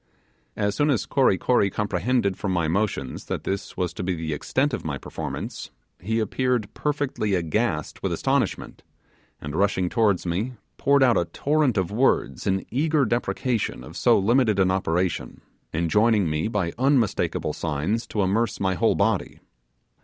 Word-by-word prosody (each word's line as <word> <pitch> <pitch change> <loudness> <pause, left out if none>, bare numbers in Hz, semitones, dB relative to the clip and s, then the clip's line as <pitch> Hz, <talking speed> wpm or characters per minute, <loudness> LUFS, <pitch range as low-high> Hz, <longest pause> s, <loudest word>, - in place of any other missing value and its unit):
As 105 -1 0
soon 145 +7 +1
as 120 -8 +1
Kory 130 -9 +3
Kory 100 0 +2
comprehended 100 +2 0
from 95 - -3
my 85 -3 +1
motions 85 -7 -2
that - - -4
this 100 0 -4
was 90 -2 -1
to - - -6
be 90 0 -1
the 80 -1 -3
extent 130 - 0
of - - -3
my 75 -4 -3
performance, - - -6 0.3
he 110 +5 -1
appeared 115 0 -1
perfectly 145 -9 -1
aghast 85 -1 -1
with - - -1
astonishment, - - -1 0.6
and 75 +1 -6
rushing 95 -1 +1
towards 105 -5 +2
me, 95 +9 -2 0.2
poured 140 0 +4
out 120 -6 +4
a 85 - 0
torrent 145 - +1
of 95 -1 0
words 120 -1 +1
in 95 0 0
eager 150 +3 +2
deprecation 120 0 -1
of - - -11
so - - +4
limited 110 +1 +3
an 95 -1 +3
operation, 90 -1 -1 0.3
enjoining 105 +5 +2
me 75 +3 -1
by 100 -7 -1
unmistakable 130 -5 +1
signs 80 +9 -2
to 105 - -1
immerse 105 +4 0
my 95 -1 +1
whole 90 - +2
body. - - 0
100 Hz, 160 wpm, -24 LUFS, 90-120 Hz, 0.6 s, poured